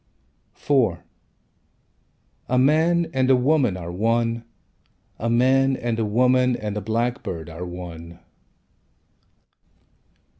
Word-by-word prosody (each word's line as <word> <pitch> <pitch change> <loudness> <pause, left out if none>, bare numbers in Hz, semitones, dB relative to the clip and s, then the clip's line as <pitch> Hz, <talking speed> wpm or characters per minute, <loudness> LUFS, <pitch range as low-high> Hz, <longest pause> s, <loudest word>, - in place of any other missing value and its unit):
IV 125 -12 +1 1.5
A 125 - +1
man 160 +6 +3
and 130 -1 +1
a 130 - +6
woman 125 -6 +2
Are 85 -1 -7
one. 115 +4 0 0.8
A 115 - -2
man 130 +3 +3
and 115 -1 -2
a 110 - 0
woman 125 +3 +2
and 105 -3 -5
a 105 - -3
blackbird 110 -7 -3
Are 85 +3 -7
one. 85 -1 -9
115 Hz, 105 wpm, -23 LUFS, 95-130 Hz, 1.5 s, a